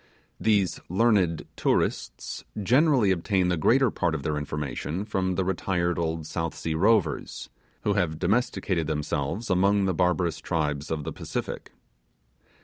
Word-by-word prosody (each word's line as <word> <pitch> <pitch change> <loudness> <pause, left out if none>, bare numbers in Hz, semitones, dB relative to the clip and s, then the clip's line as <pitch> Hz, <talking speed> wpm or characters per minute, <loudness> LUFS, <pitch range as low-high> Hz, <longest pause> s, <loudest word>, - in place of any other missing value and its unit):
These 100 -5 +2
learned 95 -5 +2
tourists - - -1 0.2
generally 125 - +4
obtain 95 0 +1
the 90 - +2
greater 120 - +3
part 85 -4 0
of 70 - -4
their 75 - -1
information 75 +5 -3
from 95 -3 -1
retired 90 -2 0
old 80 -1 -2
South 80 +1 -3
Sea 80 - -3
rovers, 90 -3 +1 0.3
who 105 - +2
have 90 -6 0
domesticated 95 -4 0
themselves 75 +7 -2
among 100 +2 +3
the 95 - +1
barbarous 90 -2 +1
tribes 75 -3 -2
of 80 -2 -2
the - - -5
Pacific. - - -5
90 Hz, 135 wpm, -26 LUFS, 80-100 Hz, 0.3 s, generally